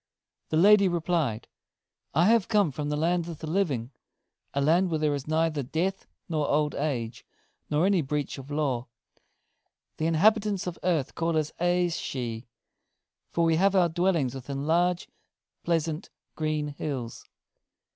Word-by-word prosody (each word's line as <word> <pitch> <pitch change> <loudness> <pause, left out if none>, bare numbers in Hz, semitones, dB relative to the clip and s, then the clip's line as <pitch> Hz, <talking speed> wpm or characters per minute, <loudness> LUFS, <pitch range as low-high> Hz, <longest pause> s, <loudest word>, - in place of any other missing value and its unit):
The 155 - +1
lady 200 +3 +6
replied: 165 -9 -1 0.7
"I 165 +3 +5
have 225 -1 +4
come 205 -7 +3
from 145 +2 -4
the 150 - 0
Land 170 +2 +1
of 165 - -6
the 160 - -7
Living 155 -9 -1 0.6
a 140 - -1
land 170 +6 +3
where 160 - 0
there 150 -1 +1
is 140 -1 -4
neither 155 -1 +1
death 165 +9 -2 0.2
nor 155 -4 -1
old 150 0 +1
age, 125 -4 -3 0.5
nor 150 +3 +2
any 195 -3 +3
breach 145 0 -3
of 135 +1 -10
law. 140 -5 -1 1.1
The 160 - 0
inhabitants 205 +4 +3
of 180 -2 -5
earth 165 -7 0
call 165 -1 0
us 155 -1 0
Aes 175 0 +1
shee, 120 -2 -4 0.8
for 170 - +1
we 165 -1 +3
have 195 +2 +3
our 180 -2 +4
dwellings 165 -6 +1
within 135 +2 -5
large, 175 +2 +1 0.6
pleasant, 165 0 -1 0.3
green 155 -1 -1
hills. 135 -5 -5
160 Hz, 150 wpm, -27 LUFS, 145-175 Hz, 1.1 s, lady